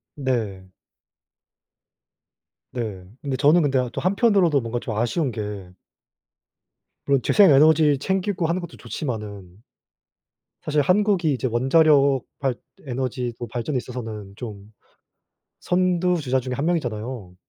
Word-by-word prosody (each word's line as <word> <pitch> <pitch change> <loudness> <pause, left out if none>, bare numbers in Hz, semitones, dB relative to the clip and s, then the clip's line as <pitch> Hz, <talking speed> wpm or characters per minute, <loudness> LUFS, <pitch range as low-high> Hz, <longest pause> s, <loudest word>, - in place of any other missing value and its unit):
네. 115 -9 -2 2.1
네. 105 -7 -5 0.2
근데 135 -3 -3
저는 155 +6 +5
근데 135 -3 +2
어 125 -1 -1
또 - - -5
한편으로도 190 - +3
뭔가 115 +1 -3
좀 110 -2 -5
아쉬운 120 +5 0
게 105 -4 -6 1.4
물론 140 -2 +2
재생 200 -6 +5
에너지 150 0 +5
챙기고 190 -2 -1
하는 175 +2 -1
것도 175 - -9
좋지만은 105 - -6 1.0
사실 150 -1 +1
한국이 180 -1 +2
이제 130 0 -2
원자력 140 +2 +4 0.2
발 135 -3 0 0.3
에너지 125 -1 -3
뭐 120 - -5
발전에 120 +4 -3
있어서는 110 -6 -6
좀 105 -3 -9 0.9
선두 180 -1 +1
주자 130 -2 0
중의 125 0 -5
1 140 - -2
명이잖아요. 120 - -3
130 Hz, 255 characters per minute, -23 LUFS, 115-160 Hz, 2.1 s, 저는